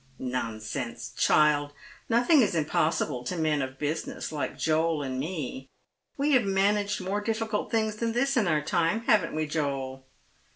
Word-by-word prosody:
" 130 - -32 0.2
Nonsense, 115 +2 -5
child! 145 -1 +3 0.4
nothing 245 +6 +5
is 205 -6 +1
impossible 155 -4 0
to 175 +8 -3
men 155 -3 +1
of 130 0 -5
business, 150 +3 -3
like 150 -2 -3
Joel 160 -1 +1
and 130 -1 -3
me. 135 -4 -4 0.5
We 285 +2 +1
have 255 -4 +5
managed 200 +1 +1
more 195 +3 -2
difficult 220 0 -2
things 220 -2 0
than 230 0 -1
this 275 +3 +1
in 220 -6 +2
our 155 -3 +1
time, 170 +6 +1
haven't 205 -8 +2
we, 155 0 0
Joel 135 -4 -3
160 Hz, 160 wpm, -28 LUFS, 140-210 Hz, 0.5 s, nothing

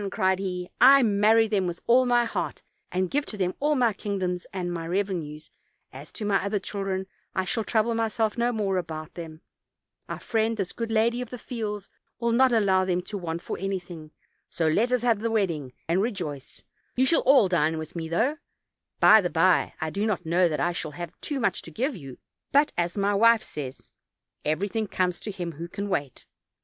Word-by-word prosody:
cried 190 0 +1
he, 180 -2 -3
"I 270 +2 +8
marry 220 +1 +4
them 200 -4 0
with 175 -1 -4
all 250 +2 +4
my 240 -1 +3
heart, 230 - -4 0.3
and 185 0 -1
give 290 +1 +1
to 210 - -7
them 185 -2 0
all 300 +1 +2
my 240 -5 +3
king 200 0 -4
doms 180 -1 -2
and 180 -2 -3
my 165 -1 -4
revenues; 170 -5 -3 0.4
as - - -10
to 215 - -4
my 200 -2 +2
other 200 +1 0
children, 195 -1 -3 0.3
I 190 - 0
shall 185 +5 -1
trouble 225 +1 +1
myself 225 -1 0
no 240 +1 +1
more 200 -4 0
about 155 -2 -7
them; 160 -2 -9 0.7
our - - -4
friend, 225 0 0
this 190 -3 -3
good 230 -1 -4
lady 230 +2 +2
of 250 - -6
the 250 - -7
fields, 210 -5 -5 0.3
will 235 0 +1
not 255 +2 +4
allow 195 -5 +3
them 180 -1 0
to 205 - -5
want 170 -1 -4
for - - -5
any 195 +1 -1
thing; 175 -4 -10 0.4
so 165 - -1
let 220 +10 +2
us 250 -2 +1
have 230 -4 +3
the 230 +2 -1
wedding 170 - -1 0.2
and 170 +4 +2
rejoice; 175 - -4 0.3
you 260 - +3
shall 330 - +4
all 265 -6 +5
dine 160 -3 +1
with 155 +1 -7
me, 165 -1 -4
though, 245 - +1 0.6
by 220 0 +8
the 175 - -1
bye, 175 +2 +3
I 160 0 -2
do 205 +5 -1
not 190 -5 -1
know 175 +2 +3
that 155 - -2
I 175 - +1
shall 160 -3 -5
have 175 -1 -5
too 290 -2 -3
much 210 -7 0
to - - -10
give 250 - -2
you; 135 -8 -10 0.3
but, 290 +2 +4
as 175 +3 -1
my 200 +1 +2
wife 230 +2 +5
says, 135 -3 -8 0.5
'everything 200 +8 -1
comes 180 -2 -1
to - - -6
him 180 -4 -4
who 165 +2 -7
can 200 +3 -5
wait.' 140 -8 -3
195 Hz, 210 wpm, -26 LUFS, 175-225 Hz, 0.7 s, I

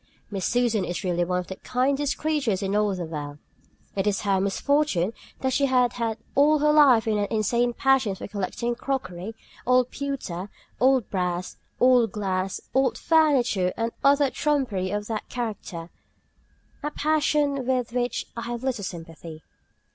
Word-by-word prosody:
Miss 195 -3 -1
Susan 235 -4 +1
is 175 +2 -4
really 175 -2 +1
one 180 +1 -1
of 180 - -2
the 190 - -7
kindest 270 +3 0
creatures 275 -11 0
in 195 +1 -1
all 210 -2 +2
the 180 -2 -4
world. 145 -2 -6 0.6
It 195 +1 0
is 205 -1 +1
her 195 -2 +1
misfortune 210 - +1 0.3
that 260 -1 0
she 275 +2 +3
has 250 -2 +3
had 230 -2 -2 0.2
all 295 +2 +5
her 300 0 +3
life 270 -7 +6
an 215 -2 +1
insane 235 +3 +1
passion 265 -7 +2
for - - -7
collecting 210 +4 -2
crockery, 225 -6 -4 0.3
old 250 0 +3
pewter, 255 -10 -4 0.3
old 260 -3 +3
brass, 180 -1 -2 0.2
old 245 -4 +5
glass, 190 -2 -2
old 265 0 +2
furniture 260 - +3
and 230 0 -1
other 280 -1 +4
trumpery 255 -11 0
of 205 +1 -2
that 220 0 -4
character; 205 -8 -5 0.9
a 295 - -2
passion 295 -3 +1
with 250 -3 0
which 245 0 -1
I 230 - -4
have 240 0 -4
little 255 -6 -1
sympathy. 165 -3 -8
230 Hz, 155 wpm, -25 LUFS, 190-270 Hz, 0.9 s, life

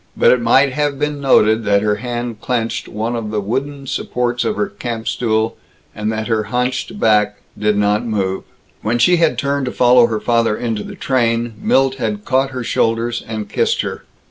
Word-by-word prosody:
But - - +5
it 125 - +3
might 130 +3 +4
have 145 -1 -1
been 150 0 -2
noted 110 -4 +4
that 100 0 +3
her 105 -1 +1
hand 120 -1 -4
clenched 115 -2 -2
one 110 +3 -3
of 115 -2 -4
the 105 0 -1
wooden 135 +7 -3
supports 125 -1 -1
of 215 - -1
her 210 - 0
camp 120 - -6
stool, 110 -2 0 0.4
and 105 +1 -2
that 110 0 -3
her 110 -2 0
hunched 125 - -2
back 105 - +3 0.2
did 105 -1 +1
not 105 +1 +2
move. 95 -4 -1 0.4
When 115 +2 0
she 175 +9 +4
had 165 -2 +2
turned 140 -1 -1
to - - -2
follow 125 -1 +5
her 110 -2 -2
father 115 -1 +1
into 115 -3 -2
the - - -9
train, 115 -3 0
Milt 135 0 +2
had 105 -4 -3
caught 135 +1 +1
her 130 -2 -5
shoulders 115 +1 0
and 110 -2 -4
kissed - - +1
her. - - -5
115 Hz, 195 wpm, -18 LUFS, 110-130 Hz, 0.4 s, But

